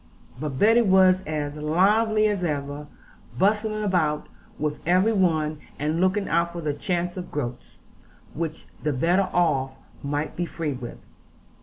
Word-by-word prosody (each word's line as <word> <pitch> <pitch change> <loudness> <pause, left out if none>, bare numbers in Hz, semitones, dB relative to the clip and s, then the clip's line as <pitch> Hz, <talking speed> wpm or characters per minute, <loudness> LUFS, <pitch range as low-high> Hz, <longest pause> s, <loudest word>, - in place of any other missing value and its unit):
But 145 -2 -4
Betty 225 - +5
was 190 -3 +5
as 150 -1 -3
lively 210 +8 +3
as 205 -3 -1
ever, 145 -2 -3 0.5
bustling 215 +2 +1
about 165 -7 +1 0.3
with 150 0 -2
every 185 +6 +3
one, 155 -6 +1 0.2
and 155 +4 -1
looking 195 +2 +1
out 170 +1 +1
for 170 - -5
the 150 -2 -1
chance 175 +4 -2
of 180 - -6
groats, 125 -4 -5 0.6
which 160 0 -4 0.2
the 150 -1 0
better 175 +8 +2
off 135 -7 +1 0.3
might 145 +2 -3
be 175 0 -2
free 160 -4 -3
with. 125 -2 -7
170 Hz, 145 wpm, -25 LUFS, 150-190 Hz, 0.6 s, Betty